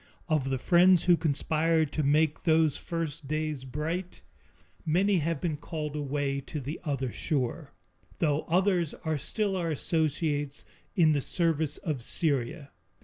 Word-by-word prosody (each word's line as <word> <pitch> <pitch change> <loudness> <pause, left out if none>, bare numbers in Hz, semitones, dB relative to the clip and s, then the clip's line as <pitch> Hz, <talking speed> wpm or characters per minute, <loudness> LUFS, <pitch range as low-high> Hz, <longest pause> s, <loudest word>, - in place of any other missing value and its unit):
Of 155 -5 +1
the 135 - 0
friends 175 +4 +5
who 175 -1 +6
conspired 160 0 +1
to 155 - -1
make 150 +2 +2
those 160 -3 +3
first 160 -4 -4
days 155 -2 -2
bright, 165 +7 -4 0.6
many 185 +4 +2
have 165 -1 -1
been 155 -2 -2
called 150 -1 -5
away 140 -1 -1
to 150 +3 -6
the 145 +4 -5
other 135 -5 -2
shore, 145 0 -2 0.5
though 150 -2 +1
others 180 -2 +2
are 160 -2 0
still 200 +6 -1
our 170 -3 -1
associates 150 -2 -1 0.3
in 165 -5 +5
the 145 -2 +1
service 160 -2 0
of 150 -7 -3
Syria. 140 +2 -1
155 Hz, 145 wpm, -29 LUFS, 145-165 Hz, 0.6 s, who